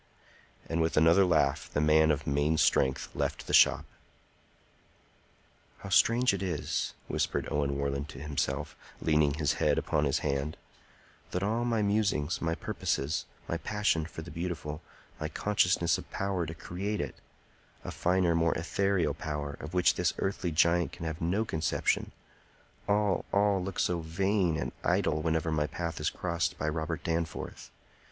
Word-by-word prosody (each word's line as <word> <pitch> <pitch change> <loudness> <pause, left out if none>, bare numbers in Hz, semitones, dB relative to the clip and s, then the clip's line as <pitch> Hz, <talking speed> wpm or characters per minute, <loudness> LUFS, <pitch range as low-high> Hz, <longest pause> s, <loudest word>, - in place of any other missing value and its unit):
And 85 0 0
with 80 -1 0
another 80 +5 +6
laugh 75 -5 +1
the - - 0
man 80 +1 +5
of 75 -1 0
main 75 +3 +1
strength 65 -3 +2
left - - -2
the - - -5
shop. - - +6 2.0
"How 100 - -7
strange 120 +5 +4
it 100 - -3
is," 85 -6 -2
whispered - - -1
Owen 70 -1 0
Warland 70 +1 -2
to 70 - -9
himself, 75 0 -2 0.2
leaning 75 -2 +2
his 75 -2 +1
head - - +3
upon 75 0 +1
his 70 - +1
hand, 70 +2 -1 0.7
"that 90 - -2
all 115 +4 0
my 115 -3 +1
musings, 100 -7 +1
my 80 0 0
purposes, 70 -1 -2 0.2
my 85 - -1
passion 85 -3 0
for 80 - -8
the 85 - -9
beautiful, 80 -2 -4 0.4
my 80 - -2
consciousness 90 -1 +2
of - - -11
power 95 -4 -2
to 80 - -6
create 100 +6 -4
it,—a 70 - -10
finer, 90 -1 +2
more 85 0 +2
ethereal 90 -1 0
power, 75 -1 -4
of 80 +3 -7
which 90 -1 +4
this - - 0
earthly 95 -2 -1
giant 85 +2 +2
can 85 - -7
have 80 -1 -4
no 95 +7 +1
conception,—all, 100 +4 -2
all, 100 -2 +2
look 95 0 -5
so 85 -1 +1
vain 90 +1 0
and - - -3
idle 75 - +1
whenever 80 0 0
my 75 -1 +1
path 85 +1 -4
is 75 - +1
crossed 85 -3 -2
by 75 - -2
Robert 80 +2 -2
Danforth! 85 -2 -3
80 Hz, 155 wpm, -30 LUFS, 75-95 Hz, 2.0 s, another